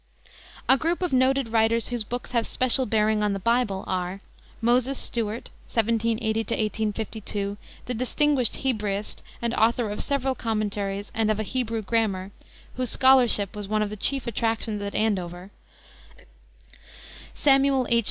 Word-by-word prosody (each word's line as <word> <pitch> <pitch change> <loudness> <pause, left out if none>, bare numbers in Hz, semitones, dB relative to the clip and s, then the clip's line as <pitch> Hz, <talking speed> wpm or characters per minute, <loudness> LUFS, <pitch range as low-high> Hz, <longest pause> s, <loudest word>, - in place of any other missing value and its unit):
A 265 - +5
group 340 +3 0
of 355 - -1
noted 260 -1 +2
writers 225 0 +2
whose 240 -2 -2
books 245 +3 -6
have 235 -2 +1
special 255 +1 +2
bearing 215 0 +2
on 210 -1 +1
the 195 - -3
Bible 230 -2 0
are: 185 +1 -3 0.4
Moses 245 +3 +2
Stuart 225 -1 -1 0.2
(1780 225 -1 0
1852), 215 -2 -2 0.3
the 250 - -3
distinguished 255 +1 +1
Hebraist 210 -5 -2 0.2
and 235 0 0
author 230 -1 +2
of 210 - -3
several 270 -1 0
commentaries 205 -4 -3
and 220 -1 +1
of 215 0 0
a - - 0
Hebrew 230 -1 -2
Grammar, 200 -3 -1 0.5
whose 255 -2 0
scholarship 245 -7 +4
was 205 -1 -6
one 215 +1 +1
of 210 - -4
the - - -4
chief 270 +5 +2
attractions 225 -2 -1
at 200 0 -5
Andover; 185 -3 -2 1.8
Samuel 275 -2 +3
H. 235 - +3
225 Hz, 145 wpm, -25 LUFS, 210-250 Hz, 1.8 s, A